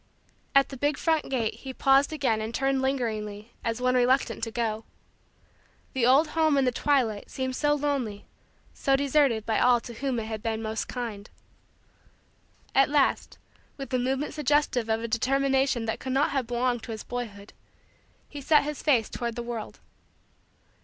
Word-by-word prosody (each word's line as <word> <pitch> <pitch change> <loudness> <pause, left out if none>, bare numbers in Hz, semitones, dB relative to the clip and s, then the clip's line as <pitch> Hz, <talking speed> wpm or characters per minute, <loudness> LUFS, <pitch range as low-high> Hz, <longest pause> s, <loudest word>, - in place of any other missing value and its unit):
At 275 0 +5
the 270 - -8
big 290 +2 0
front 320 -3 0
gate 235 -5 0
he 265 -1 -8
paused 275 +2 +4
again 265 -8 0
and 220 +2 -4
turned 270 0 +1
lingeringly 220 -5 -3
as 230 0 -2
one 255 0 +2
reluctant 250 -2 +2
to - - -5
go. 225 -1 -2 1.1
The 245 -3 +2
old 285 +5 +5
home 315 -2 +2
in 270 - +3
the 250 - +2
twilight 245 -6 0
seemed 260 -1 -3
so 295 +1 +2
lonely, 275 -8 -2 0.5
so 275 - +1
deserted 275 -5 +2
by 220 - +1
all 245 -1 +5
to 240 - -9
whom 265 +1 -2
it 220 - -4
had 220 -1 -5
been 220 0 -2
most 220 0 -3
kind. 225 -5 -6 1.4
At 270 0 +4
last, 290 -2 +1 0.4
with 275 -2 -7
a 255 - +2
movement 265 +4 -1
suggestive 290 -5 +1
of 220 +1 0
a - - -2
determination 265 +1 +1
that 220 - -3
could 260 - -4
not 275 +2 +2
have 270 -4 -1
belonged 240 0 0
to 230 - -8
his 220 - -6
boyhood, 215 -5 -6 0.7
he 290 - -8
set 300 +2 +4
his 300 0 -5
face 250 -8 +3
toward 235 -1 -4
the 240 - -4
world. 235 -2 -6
255 Hz, 175 wpm, -27 LUFS, 225-275 Hz, 1.4 s, At